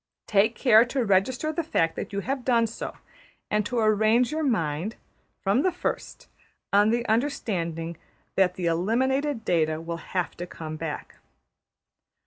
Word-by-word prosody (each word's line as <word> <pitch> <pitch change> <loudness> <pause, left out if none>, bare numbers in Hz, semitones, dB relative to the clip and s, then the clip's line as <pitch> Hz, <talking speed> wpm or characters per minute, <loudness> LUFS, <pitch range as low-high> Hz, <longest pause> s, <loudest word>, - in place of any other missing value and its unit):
Take 215 +3 +3
care 230 -4 +6
to 245 0 -1
register 245 +10 +2
the 335 - 0
fact 165 - +1
that - - -5
you 200 0 -2
have 265 +3 -3
done 235 -2 +3
so, 225 - -6 0.5
and 210 0 +2
to 245 - -3
arrange 220 +3 +3
your 315 +1 -1
mind, 180 - -1 0.5
from 200 +7 +3
the 370 - +2
first, 355 - -4 0.5
on 205 +1 +5
the 235 +1 +1
understanding 170 - -1 0.4
that 185 -2 +3
the 180 - -3
eliminated 235 - +1
data 160 -2 +1
will 165 +1 -5
have 180 +1 -3
to 175 - -5
come 155 -2 -7
back. 155 -1 -6
215 Hz, 150 wpm, -26 LUFS, 170-245 Hz, 0.5 s, care